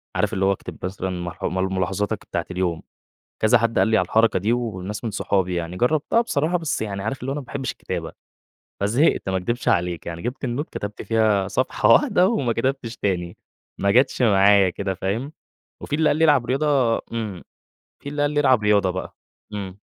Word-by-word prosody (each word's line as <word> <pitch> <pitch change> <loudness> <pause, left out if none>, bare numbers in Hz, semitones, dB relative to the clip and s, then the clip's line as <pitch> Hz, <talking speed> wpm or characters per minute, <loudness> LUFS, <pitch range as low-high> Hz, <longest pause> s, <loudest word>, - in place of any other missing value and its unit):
عارف، 105 +1 0
اللي 95 0 +1
هو 100 - +4
أكتب 100 - -6
مثلًا 95 0 -3
ملاح 90 -1 -6
ملاحظاتك 95 +3 -1
بتاعة 85 - -3
اليوم. 90 -3 -1 0.6
كذا 110 +3 +5
حد 115 0 0
قال - - +4
لي 110 - +3
على 90 - +2
الحركة 110 0 +3
دي 110 +5 +1
وناس 105 -3 -4
من 110 - -2
صحابي 95 -2 0
يعني. 85 +1 -4
جرَّبتها 155 - +2
بصراحة، 175 -6 0
بس 160 -8 -2
يعني 100 -2 -3
عارف 115 +4 -3
اللي 130 - -4
هو - - -1
أنا 150 - -3
ما 130 - -13
باحبش 135 0 -4
الكتابة، - - -5 0.7
فزهِقت، 115 +2 +2
ما 95 - 0
اكدبش 120 +7 -2
عليك. 85 -1 0
يعني 85 0 -6
جِبت 125 +3 -4
النوت، 130 +5 -2
كتبت 105 0 -6
فيها 110 -4 +2
صفحة 130 +5 0
واحدة 205 -10 +5
وما 135 - 0
كتبتش 120 -1 -2
تاني، 90 -3 -2 0.4
ما 100 - +2
جتش 130 +3 +3
معايا 100 -3 +5
كده. 95 +1 -3
فاهم؟ 110 - -3 0.5
وفي - - -4
اللي 155 -1 +3
قال - - +2
لي 160 - +3
ألعب 145 -6 +4
رياضة 135 -4 +2
إمم، 110 -6 -4 0.6
في 140 - -7
اللي 145 0 -2
قال 145 - +2
لي 145 0 +1
ألعب 130 -6 +4
رياضة 100 -3 +3
بقى، 95 0 -6 0.4
إمم. 100 -2 -6
110 Hz, 195 wpm, -23 LUFS, 95-130 Hz, 0.7 s, كذا